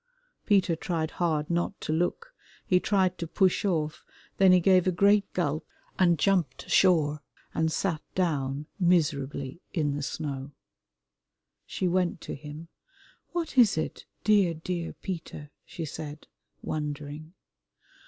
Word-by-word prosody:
Peter 190 -5 +3
tried 160 -1 -2
hard 155 -4 0
not 175 +3 -1
to 155 - -2
look, 175 - -1 0.3
he 180 - +4
tried 185 -2 +1
to 170 - -3
push 185 +2 +2
off, 160 -6 -1 0.3
then 190 -1 +6
he 185 - +7
gave 185 0 +4
a - - +4
great 200 +3 +3
gulp 155 -3 -1 0.4
and 175 -2 +4
jumped 170 -7 +1
ashore 155 -5 +3 0.3
and 160 0 +1
sat 165 -3 -1
down 145 -5 0
miserably 150 -4 +1
in 150 -5 0
the 145 - -3
snow. 140 0 -4 1.1
She 185 - -1
went 180 -1 +1
to - - -6
him. 150 +3 -9 0.6
"What 330 -6 -1
is 215 -8 +6
it, 155 - -4 0.2
dear, 200 -6 +4
dear 170 +1 -4
Peter?" 160 -5 -7 0.2
she 165 - -5
said, 150 0 -7 0.4
wondering. 150 +1 -5
165 Hz, 135 wpm, -28 LUFS, 150-185 Hz, 1.1 s, he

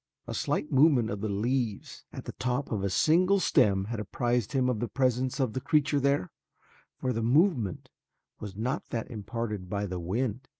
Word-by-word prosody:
A - - -5
slight 150 - -1
movement 135 -5 +4
of 100 -1 -4
the 110 - -2
leaves 115 +1 -2
at - - -8
the - - -5
top 125 +3 -2
of 105 -4 -1
a 100 - +1
single 180 - +3
stem 100 - +3
had 115 +1 -4
apprised 120 +2 -1
him 130 -2 +2
of 125 -4 0
the 120 - -1
presence 130 +3 0
of 130 -5 0
a - - 0
creature 145 0 +2
there, 140 -9 +1 0.7
for 130 -1 -1
the 115 - -2
movement 125 - +1 0.5
was 100 -3 -7
not 125 +6 -2
that 115 0 -4
imparted 105 -3 -4
by 100 +1 -1
the 90 -2 -4
wind. 115 +8 -2
120 Hz, 185 wpm, -29 LUFS, 105-135 Hz, 0.7 s, movement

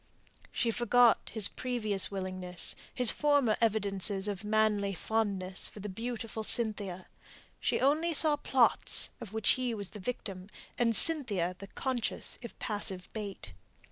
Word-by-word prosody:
She 235 - -1
forgot 240 0 +3
his 215 -4 +5
previous 215 -6 -1
willingness, 185 -2 -2 0.2
his 250 -3 +5
former 285 -7 +2
evidences 200 -2 +1
of 205 -1 -4
manly 210 -2 0
fondness 195 -2 0
for - - -12
the 205 +1 -6
beautiful 225 +1 -6
Cynthia; 205 -6 0 0.5
she - - -1
only 310 +5 +1
saw 310 -1 +4
plots 265 -4 +2
of 225 -5 -9
which 220 0 0
he 250 -2 0
was 200 -3 -3
the 210 - -10
victim, 195 -3 -6 0.3
and 230 -2 +1
Cynthia 210 - +4
the 195 - -9
conscious 250 +1 -3
if 235 - -10
passive 200 -3 -3
bait. 200 - -7
215 Hz, 140 wpm, -30 LUFS, 195-240 Hz, 0.5 s, his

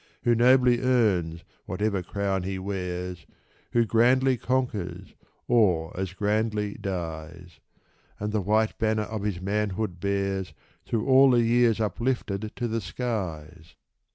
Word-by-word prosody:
Who 120 - +4
nobly 125 +1 +5
earns 100 -10 +1 0.2
whatever 100 +1 -1
crown 95 +1 -2
he 95 +1 -4
wears, 90 -3 -5 0.5
Who 120 -1 +4
grandly 125 +4 +3
conquers, 120 -7 -2 0.3
or 90 -9 +2
as 95 0 -3
grandly 105 0 0
dies; 85 -2 -6 0.6
And 105 +1 -3
the 105 - +1
white 110 +3 +1
banner 110 -1 +1
of 110 -1 -5
his 100 -3 -2
manhood 100 -1 -2
bears. 95 -3 -2 0.3
Through 115 -2 -1
all 135 +1 +7
the 120 -2 +4
years 115 -1 +3
uplifted 110 -2 -2
to 120 - -2
the 115 0 -2
skies 90 -8 -5
105 Hz, 125 wpm, -26 LUFS, 90-115 Hz, 0.6 s, all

